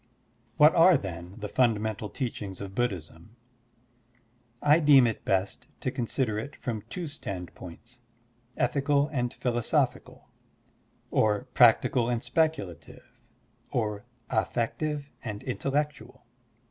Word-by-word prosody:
What 150 +1 +7
are, 175 0 +6
then, 90 -3 -7
the 105 -2 -5
fundamental 110 -3 0
teachings 105 -8 -5
of 100 -1 -7
Buddhism? 95 -3 -4 1.2
I 150 +5 +5
deem 145 -5 +7
it 115 -2 -2
best 95 0 -1
to - - -1
consider 115 -2 -1
it 140 +7 -7
from 115 -5 -4
two 180 -2 -4
standpoints, 100 - -8 0.6
ethical 140 +3 +1
and 125 -5 -1
philosophical, 120 -3 -1 0.8
or 105 +1 +2
practical 120 0 +4
and 120 -1 -1
speculative, 155 - -2 0.5
or 105 -3 -2 0.3
affective 145 +4 -1
and 105 -4 -5
intel 135 +2 -3
lectual. 145 -3 -2
120 Hz, 110 wpm, -28 LUFS, 105-140 Hz, 1.2 s, What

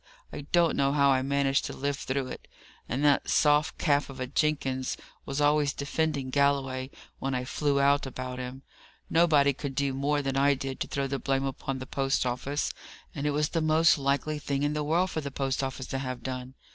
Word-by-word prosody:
I 145 - -7
don't 170 -2 +4
know 140 0 +2
how 140 -1 +4
I 130 -1 +3
managed 135 0 +1
to - - -6
live 140 +1 -1
through 135 0 -2
it; - - -9 0.4
and 135 +5 0
that 145 -1 +3
soft 150 +2 +3
calf 145 -3 +1
of 135 -1 -9
a 130 - -1
Jenkins 135 -1 -1 0.3
was 135 +1 -2
always 145 0 +3
defending 140 -2 -2
Galloway 135 -2 +1 0.3
when 135 -1 -2
I 125 0 -2
flew 140 +1 0
out 140 0 +3
about 130 -1 -5
him. 125 +2 -6 0.5
Nobody 150 -4 +4
could 135 0 -5
do 140 -1 0
more 145 +2 0
than 135 -1 -1
I 140 +1 +4
did 135 0 -5
to - - -2
throw 140 -1 -2
the 135 0 -2
blame 135 +2 0
upon 135 0 -3
the 130 - -6
post 135 0 0
office 135 +4 -2 0.4
and 145 0 -2
it - - +3
was 150 +1 +1
the 165 - -1
most 160 +1 +5
likely 140 +2 0
thing 140 -1 -2
in 145 0 +1
the 150 0 -1
world 175 +5 +1
for 160 - -2
the 140 - -4
post 135 -1 -1
office 135 -1 -4
to 135 - -1
have 130 -2 -5
done? 130 0 -5
140 Hz, 210 wpm, -28 LUFS, 135-145 Hz, 0.5 s, most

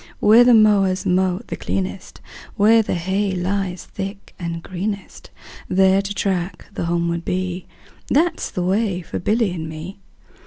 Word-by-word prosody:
Where 220 +3 +7
the 245 -1 +6
mowers 200 -4 +4
mow 185 +1 +1
the - - -5
cleanest, 190 -1 -4 0.3
Where 225 +3 +5
the 210 - -2
hay 190 +3 -1
lies 185 0 -2
thick 195 +1 -7
and 170 -1 -4
greenest, 195 +2 -5 0.4
10 185 - -3
There 190 0 +5
to 200 +1 -5
track 185 -2 -2
the - - -3
homeward 170 0 -1
bee, 185 0 -3 0.4
That 325 +6 +2
's - - -3
the 180 - -3
way 190 -1 0
for - - -5
Billy 215 +1 +1
and 160 -3 -5
me. 165 +5 -8
190 Hz, 160 wpm, -21 LUFS, 180-200 Hz, 0.4 s, Where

